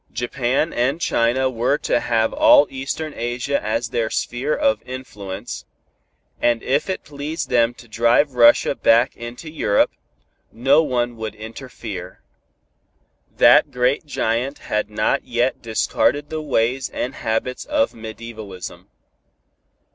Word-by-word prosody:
Japan 125 +5 -1
and 135 +6 0
China 125 -3 +1
were 125 +3 +1
to - - 0
have 115 -2 +1
all 300 -1 +6
Eastern 140 +3 -4
Asia 120 +4 -2
as 115 +3 -1
their 115 -2 -1
sphere 130 +7 -1
of 280 -2 +1
influence, 105 -5 -7 0.8
and 120 -1 +2
if 140 +8 0
it 190 - -3
pleased 145 +2 -5
them 120 -1 +2
to 120 - -15
drive 120 +5 +2
Russia 120 -1 +5
back 120 +3 +3
into 120 +6 -8
Europe, 130 -10 +1 0.6
no 135 +6 +4
one 120 -5 -1
would 110 -1 -5
interfere. 110 -4 -8 1.1
That - - +6
great 125 +4 +1
giant 125 +1 -1 0.2
had 105 0 0
not 105 0 0
yet 120 +2 0
discarded 145 +6 0
the 155 0 -3
ways 130 -2 0
and 125 - -3
habits 115 +2 -2
of 290 -1 +1
medievalism. 110 -4 -9
120 Hz, 125 wpm, -21 LUFS, 115-140 Hz, 1.1 s, all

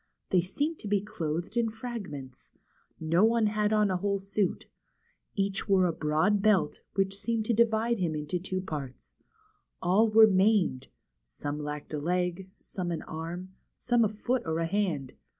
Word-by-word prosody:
They 185 - +5
seemed 290 - -2
to - - -7
be 205 0 +2
clothed 175 -1 -4
in 235 -1 +2
fragments. 200 - -7 0.5
No 165 +4 +2
one 225 0 +4
had 210 0 +1
on 210 -2 +3
a 185 - +1
whole 200 +2 0
suit. 195 0 -1 0.7
Each 195 +1 -1
wore 190 -2 +5
a 170 - +1
broad 160 +7 +1
belt, 195 -8 +2
which 195 0 +1
seemed 225 +2 -2
to 235 - +1
divide 230 0 +2
him 165 -4 0
into 150 +4 -2
two 185 +1 -3
parts. 140 -8 -7 0.6
All 200 +5 +3
were 220 +1 +8
maimed: 190 -9 +2 0.4
some 145 - -5
lacked 150 0 -6
a 150 - -1
leg, 180 +3 -1
some 180 -2 -5
an 170 - -3
arm, 170 +4 -6 0.2
some 240 -1 +2
a 215 - +2
foot 240 +4 -1
or 160 0 -2
a 165 - 0
hand. 165 -8 -1
190 Hz, 170 wpm, -29 LUFS, 160-215 Hz, 0.7 s, were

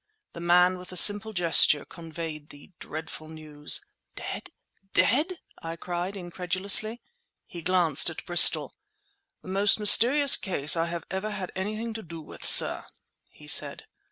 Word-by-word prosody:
The - - -11
man, 180 +1 +1
with 180 0 -13
a 185 - -7
simple 205 +3 +5
gesture, 170 -5 +1
conveyed 160 -2 -10
the 145 +6 -18
dreadful 155 0 -10
news. 155 - -2 0.3
"Dead! - - -9 0.4
dead!" 310 - 0 0.2
I 165 0 -8
cried 175 +3 -7
incredulously. 185 +5 0 0.4
He 170 - -11
glanced 170 -4 +2
at 160 - -11
Bristol. 160 -4 +4 0.7
"The - - -13
most 200 +2 +1
mysterious 250 +7 +5
case 155 -6 0
I 165 0 -3
have 170 -1 -8
ever 190 +3 -5
had 195 -3 -8
anything 215 +4 -6
to 220 - -9
do 165 -3 -12
with, 155 - -14
sir," - - +4 0.5
he - - -19
said. - - -1
180 Hz, 145 wpm, -24 LUFS, 165-205 Hz, 0.7 s, simple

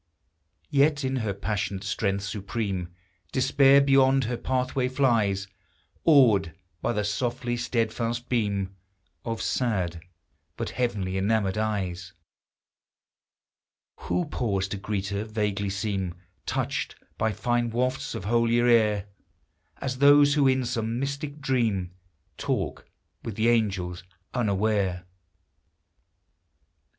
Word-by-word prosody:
Yet 145 +1 +3
in 130 0 0
her 110 -4 -1
passionate 100 -1 -3
strength 100 -2 -1
supreme, 100 -3 -3 0.4
Despair 135 +1 +5
beyond 135 -1 +4
her 120 +1 -2
pathway 130 +1 -1
flies, 115 -7 +1 0.6
Awed 110 - +5 0.3
by - - 0
the 105 -3 -1
softly 120 +4 -1
steadfast 120 0 -1
beam 100 -5 -1 0.5
Of 115 -1 -3
sad, 90 -9 -1 0.6
but 115 - -3
heaven 110 -7 -1
enamored 95 +1 0
eyes! 95 -5 -2 1.8
Who 175 - -1
pause 100 -9 -1
to 100 - -3
greet 100 -1 -3
her, 100 +1 -2
vaguely 105 -2 -2
seem 95 -3 -2 0.3
Touched - - -2 0.2
bv 110 -1 +1
fine 120 -1 0
wafts 130 +5 -1
of 95 - -5
holier 115 +2 +3
air; 105 -4 +3 0.7
As 130 -1 -4
those 145 0 +7
who 145 -2 +4
in 130 -1 +2
some 115 0 -2
mystic 140 +2 -4
dream 115 -10 0 0.5
Talk - - -2 0.3
with 115 - -6
the 110 +2 +2
angels 95 -7 0 0.3
unaware! 100 -5 0
115 Hz, 110 wpm, -26 LUFS, 100-130 Hz, 1.8 s, those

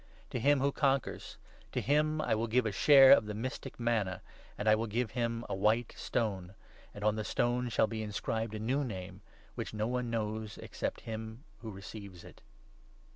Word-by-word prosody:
To 125 - -2
him 140 +3 +3
who 140 +1 +2
conquers 135 -2 -1 0.2
— - - -26
to - - 0
him 155 +2 +2
I - - +1
will 110 +2 0
give 120 +2 +2
a 110 - 0
share 135 +7 +8
of 115 -6 +7
the 105 - -4
mystic 125 +3 -5
manna, 110 -6 0 0.3
and 105 - -3
I 110 - +7
will 110 +1 0
give 110 0 -1
him 115 -1 -2
a - - -3
white 110 +4 +1
stone; 95 -5 -2 0.4
and 105 - -9
on 105 0 +2
the 110 - -2
stone 120 +3 0
shall 110 - +3
be 110 0 -4
inscribed 110 +1 -3
a - - -4
new 130 +7 0
name, 95 -8 -6 0.3
which - - -5
no 105 0 0
one 125 0 -1
knows 110 -1 -3
except - - -4
him 110 +2 -7 0.2
who 110 0 -7
receives 100 -2 -9
it." - - -14
110 Hz, 195 wpm, -32 LUFS, 105-125 Hz, 0.4 s, share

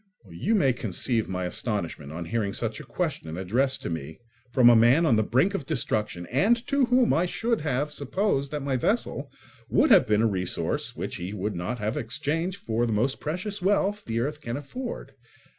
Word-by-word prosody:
You 185 - 0
may 135 -11 +3
conceive 115 0 -1
my 90 -1 -2
astonishment 90 - -3
on 85 +2 -5
hearing 105 0 -1
such 115 -2 -2
a - - -8
question 140 - -3
addressed 120 +9 0
to - - -3
me 80 -1 -5 0.3
from 125 -2 +5
a 120 - +8
man 120 +9 +5
on 130 -8 +4
the 110 - +3
brink 130 - +2
of 160 -9 -4
destruction 105 - -1
and 200 - +4
to 280 0 +2
whom 250 0 +3
I 175 +3 +2
should 230 +3 -1
have 145 0 -1
supposed 140 0 -1
that 150 -1 -4
my 135 -2 0
vessel - - -1 0.4
would - - +3
have - - +7
been 105 +1 +3
a - - +4
resource 90 -4 -2
which - - -4
he 90 +3 -5
would 105 +1 -3
not 90 +8 -3
have 110 +4 -2
exchanged 155 - -2
for 115 - -1
the 115 - 0
most 125 +6 0
precious 190 +6 -4
wealth 205 +2 +1
the 115 0 -1
earth 150 +4 -3
can 120 -2 -4
afford. 235 - -6
125 Hz, 195 wpm, -26 LUFS, 105-165 Hz, 0.4 s, a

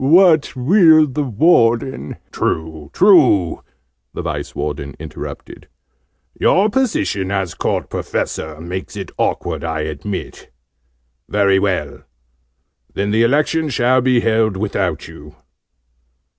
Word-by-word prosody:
"What 160 0 +4
will 160 +3 +5
the 150 +1 -3
Warden 120 - +1
" - - -42
"True, 80 -2 -3
true!" 140 - +4 0.5
the - - -4
Vice - - -5
Warden 70 -1 -4
interrupted. - - -9 0.7
"Your 205 +3 +2
position, 100 - -1
as 95 -3 -2
Court - - -2
Professor, 80 -1 -4
makes 90 +3 -6
it - - -6
awkward, - - -2
I 80 -1 -2
admit. 80 +6 -6 0.8
Well, 100 -2 +2
well! 95 -3 -2 0.9
Then 100 +1 -2
the 110 +2 +2
Election 150 +5 +1
shall 130 0 +2
be 125 -1 +2
held 110 -3 +1
without 95 -6 -2
you." 75 -2 -13
110 Hz, 115 wpm, -18 LUFS, 85-145 Hz, 0.9 s, will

